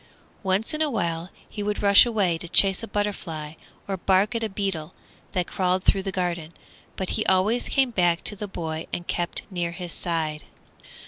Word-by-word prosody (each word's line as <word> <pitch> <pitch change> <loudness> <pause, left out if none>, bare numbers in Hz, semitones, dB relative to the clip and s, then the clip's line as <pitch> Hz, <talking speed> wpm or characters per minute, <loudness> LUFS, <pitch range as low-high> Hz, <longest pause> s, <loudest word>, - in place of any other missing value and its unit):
Once 195 +7 0
in 305 - -2
a 310 - +2
while 170 -7 -2 0.2
he 210 - -6
would 205 0 -2
rush 200 +3 +8
away 200 -7 +1
to 165 +1 -7
chase 195 +2 +6
a 225 - -6
butterfly 185 -8 -3 0.3
or 195 -1 -2
bark 190 +4 +2
at 230 -1 -1
a 220 - -1
beetle 190 -5 -3 0.4
that 180 -1 0
crawled 185 0 0
through 195 - +3
the 195 0 -4
garden, 175 -3 -2 0.4
but 190 - -3
he 215 - 0
always 195 +6 +2
came 265 -3 +2
back 175 -5 +2
to 210 - -1
the 205 +1 -5
boy 160 -4 -5
and 175 - -4
kept 175 0 -2
near 175 -2 -1
his 175 -1 -5
side. 155 -3 -2
190 Hz, 190 wpm, -25 LUFS, 170-205 Hz, 0.4 s, rush